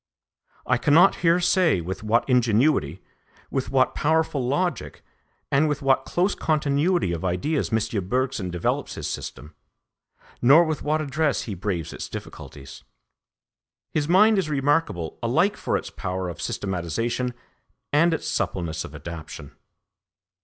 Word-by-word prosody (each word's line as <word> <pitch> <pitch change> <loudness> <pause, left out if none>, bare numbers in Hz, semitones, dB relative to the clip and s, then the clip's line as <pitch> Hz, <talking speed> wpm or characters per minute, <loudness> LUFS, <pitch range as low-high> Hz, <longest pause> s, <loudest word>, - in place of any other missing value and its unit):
I - - +2
cannot 165 +6 +5
here 170 +1 +3
say 175 - +3
with 90 +3 -5
what 110 +3 +1
ingenuity, 115 - +2 0.5
with 135 -2 -2
what 130 -1 +2
powerful 160 -3 +1
logic, 145 +3 -2 0.5
and 150 +3 +3
with 145 -1 -3
what 135 -1 +2
close 185 +3 +1
continuity 150 - +1
of 85 0 -4
ideas 95 - -1
M. 110 -3 -1
Bergson 125 -6 -1
develops 85 -1 -2
his - - -5
system, 75 - -7 0.9
nor 140 +8 +7
with 155 -3 -2
what 155 +1 0
address 150 -1 0
he 110 - -5
braves 90 -4 -3
its - - -7
difficulties. 70 -1 -10 1.1
His 150 0 -1
mind 210 +3 +5
is 170 -5 -2
remarkable 140 - 0
alike - - +2
for - - -1
its - - -7
power 90 0 -4
of 85 - -8
systematisation 115 +7 -2 0.6
and 165 +4 +4
its 160 - -2
suppleness 80 -4 -2
of - - -10
adaptation. 80 -3 -9
130 Hz, 135 wpm, -24 LUFS, 95-155 Hz, 1.1 s, nor